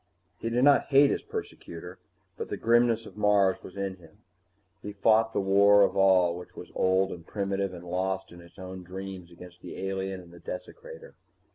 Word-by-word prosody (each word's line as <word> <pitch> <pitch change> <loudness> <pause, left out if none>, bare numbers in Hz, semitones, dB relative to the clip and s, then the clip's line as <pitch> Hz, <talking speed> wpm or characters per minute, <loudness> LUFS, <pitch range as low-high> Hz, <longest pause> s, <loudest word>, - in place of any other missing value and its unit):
He 115 - -3
did 120 +2 +1
not 145 0 +5
hate 140 0 +5
his - - -1
persecutor, 440 0 -8 0.4
but 455 - -6
the - - -3
grimness 115 0 +2
of - - -13
Mars 100 -2 +3
was 95 - -12
in 95 -1 -3
him. 80 -3 -20 0.6
He 105 - -6
fought 110 +2 +3
the - - -1
war 100 +1 +5
of - - +1
all 95 -3 +4
which 90 0 -11
was - - -10
old 95 +1 +2
and 85 - -8
primitive 100 0 -2
and 90 -1 -10
lost 95 +2 -2
in 85 0 -12
its 85 - -18
own 95 0 -8
dreams 95 -1 -8
against 90 +1 -14
the - - -9
alien 95 0 -3
and 85 -1 -15
the 85 - -13
desecrator. 480 - -9
95 Hz, 190 wpm, -28 LUFS, 90-110 Hz, 0.6 s, not